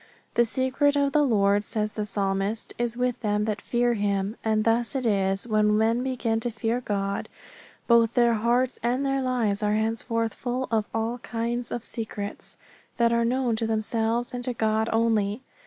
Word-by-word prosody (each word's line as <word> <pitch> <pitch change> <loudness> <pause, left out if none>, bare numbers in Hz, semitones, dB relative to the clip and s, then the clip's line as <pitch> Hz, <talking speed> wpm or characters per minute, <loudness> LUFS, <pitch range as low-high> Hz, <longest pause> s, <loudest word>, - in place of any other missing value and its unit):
The 235 - +4
secret 260 +4 +1
of 280 -1 +2
the 300 - +4
Lord, 205 -6 +3
says 215 0 -2
the 210 - -3
Psalmist, 195 +2 -1
is 240 -1 -1
with 250 -1 0
them 210 -2 0
that 210 -2 -2
fear 240 0 +1
Him. 200 -1 -1
And 215 -1 +1
thus 230 +3 +1
it 260 -2 -1
is 195 -3 +2
that 235 - -9
when 210 0 +3
men 225 +2 +2
begin 245 -3 -1
to 240 - -1
fear 230 +2 -2
God, 200 -3 -2 0.6
both 235 -1 +4
their 235 -1 +4
hearts 240 +3 +1
and 250 +4 0
their 270 0 +1
lives 235 -6 0
are 210 0 +1
henceforth 225 +1 -1
full 255 +1 -3
of 220 -2 0
all 225 +2 -2
kinds 235 +1 -3
of 240 - -3
secrets 215 -3 -5 0.4
that 235 -1 +3
are 235 0 +2
known 245 0 +1
to 225 0 -1
themselves 225 +2 0
and 245 0 -4
to 250 - -1
God 220 0 +1
only. 225 0 +1
230 Hz, 185 wpm, -26 LUFS, 215-245 Hz, 0.6 s, The